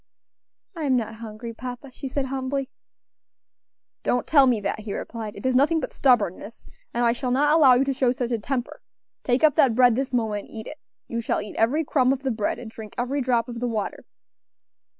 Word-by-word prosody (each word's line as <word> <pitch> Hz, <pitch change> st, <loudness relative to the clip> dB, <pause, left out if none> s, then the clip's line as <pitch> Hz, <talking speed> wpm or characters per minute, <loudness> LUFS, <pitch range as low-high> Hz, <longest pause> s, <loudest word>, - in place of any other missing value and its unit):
"I 320 Hz, -3 st, -3 dB
am 265 Hz, -2 st, +3 dB
not 225 Hz, -2 st, -2 dB
hungry, 230 Hz, +1 st, -7 dB
papa," 250 Hz, +3 st, -8 dB
she 270 Hz, -, -6 dB
said 265 Hz, +1 st, -2 dB
humbly. 265 Hz, 0 st, -3 dB, 1.3 s
"Don't 245 Hz, -, 0 dB
tell 280 Hz, -4 st, +5 dB
me 240 Hz, -4 st, +2 dB
that," 205 Hz, -, -2 dB
he 210 Hz, -2 st, -5 dB
replied, 220 Hz, -3 st, -6 dB
"it -, -, -9 dB
is 260 Hz, -1 st, +2 dB
nothing 300 Hz, +5 st, +4 dB
but 280 Hz, -, -5 dB
stubbornness; 230 Hz, -4 st, +1 dB, 0.3 s
and 240 Hz, 0 st, 0 dB
I 235 Hz, -, +4 dB
shall 250 Hz, +2 st, -3 dB
not 290 Hz, +4 st, +3 dB
allow 275 Hz, -6 st, +7 dB
you 250 Hz, -, +3 dB
to 275 Hz, 0 st, -1 dB
show 255 Hz, -2 st, +2 dB
such 245 Hz, -1 st, -3 dB
a 230 Hz, -, 0 dB
temper. 245 Hz, +3 st, -4 dB, 0.4 s
Take 250 Hz, +2 st, +1 dB
up 310 Hz, -2 st, +6 dB
that 245 Hz, -5 st, +4 dB
bread 245 Hz, -2 st, +5 dB
this 265 Hz, +1 st, -2 dB
moment 220 Hz, -4 st, -1 dB
and -, -, -14 dB
eat 220 Hz, -, -6 dB
it. 305 Hz, -, -8 dB, 0.3 s
You 235 Hz, 0 st, -3 dB
shall -, -, -1 dB
eat 210 Hz, -, -7 dB
every 260 Hz, +9 st, +2 dB
crumb 260 Hz, -3 st, +2 dB
of 270 Hz, 0 st, -2 dB
the 265 Hz, -, 0 dB
bread 215 Hz, -2 st, -1 dB
and 230 Hz, -2 st, -9 dB
drink 220 Hz, -2 st, -10 dB
every 255 Hz, +4 st, -1 dB
drop 240 Hz, -3 st, +1 dB
of 235 Hz, -1 st, -6 dB
the 245 Hz, -, -1 dB
water." 220 Hz, -4 st, -3 dB
245 Hz, 215 wpm, -24 LUFS, 230-270 Hz, 1.3 s, allow